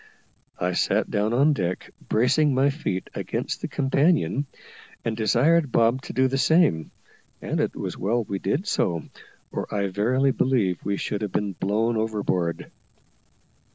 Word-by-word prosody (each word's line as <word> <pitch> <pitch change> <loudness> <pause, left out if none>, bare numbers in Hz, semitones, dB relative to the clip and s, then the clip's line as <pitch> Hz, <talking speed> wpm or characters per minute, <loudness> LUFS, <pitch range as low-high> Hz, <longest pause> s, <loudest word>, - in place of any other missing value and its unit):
I 90 +1 0
sat - - +1
down 105 +2 +1
on 140 +6 +4
deck, 90 -8 -3 0.2
bracing 135 +5 +3
my 135 +2 +3
feet 115 - -3
against - - -3
the - - -2
companion, 140 - +1 0.6
and 115 - -1
desired 130 +8 +3
Bob 115 +3 +3
to - - -6
do 130 0 +3
the 135 +1 -1
same; 160 - +3 0.5
and - - -3
it - - -1
was - - -5
well 115 +5 0
we 100 -2 -4
did 155 - -1
so, 85 - 0 0.5
or - - -4
I 100 -1 0
verily 125 +8 +2
believe 110 -11 +1
we 100 0 -1
should 105 +1 -3
have 105 -3 -3
been 100 -2 -1
blown 110 +5 0
overboard. 105 -6 -1
115 Hz, 155 wpm, -24 LUFS, 100-135 Hz, 0.6 s, on